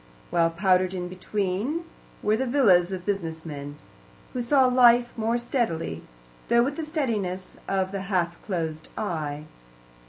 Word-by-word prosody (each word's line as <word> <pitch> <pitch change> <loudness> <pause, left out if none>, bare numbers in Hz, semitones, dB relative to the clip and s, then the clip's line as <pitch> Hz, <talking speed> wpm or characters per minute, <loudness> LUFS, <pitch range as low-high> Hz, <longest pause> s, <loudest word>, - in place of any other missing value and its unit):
While, 165 -1 +3
powdered 185 +1 +2
in 180 -1 -4
between, 200 - -2 0.4
were 210 +1 +3
the 260 +3 -1
villas 195 -9 +4
of 185 -1 -5
business 165 -6 -3
men, 145 -2 -7 0.6
who 250 - -2
saw 265 +2 +4
life 245 -1 +5
more 230 +1 0
steadily, 170 - -1 0.5
though 235 0 +5
with 280 +3 -1
the 320 - -4
steadiness 215 - -2
of 190 -1 0
the 195 -1 -3
half 180 -3 -1
closed 160 -5 -3
eye. 150 -7 -3
190 Hz, 145 wpm, -26 LUFS, 170-240 Hz, 0.6 s, life